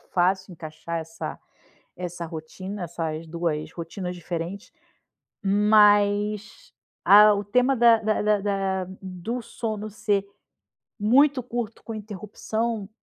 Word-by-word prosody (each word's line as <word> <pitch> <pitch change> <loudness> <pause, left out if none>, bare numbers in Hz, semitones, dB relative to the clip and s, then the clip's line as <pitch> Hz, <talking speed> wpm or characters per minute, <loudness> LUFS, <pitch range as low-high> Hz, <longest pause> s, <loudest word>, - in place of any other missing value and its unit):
fácil 190 +1 +1
encaixar 160 +1 -6
essa 165 +1 -7 0.6
essa 175 -1 -5
rotina, 175 +5 -7
essas 160 -1 -4
2 165 -2 -2
rotinas 180 +2 -6
diferentes, 175 +3 -6 0.7
mas 210 - +3 0.3
a 210 +1 +8
o 205 - -2
tema 250 +6 +2
da 235 -1 +6
da 215 0 0
da 210 -1 +2
da 195 -2 -1 0.2
do 190 +6 -5
sono 215 -2 -5
ser 200 -1 0 0.7
muito 260 +5 +4
curto 235 -2 -5
com 225 - -6
interrupção, 215 +1 -4
200 Hz, 110 wpm, -25 LUFS, 175-215 Hz, 0.7 s, a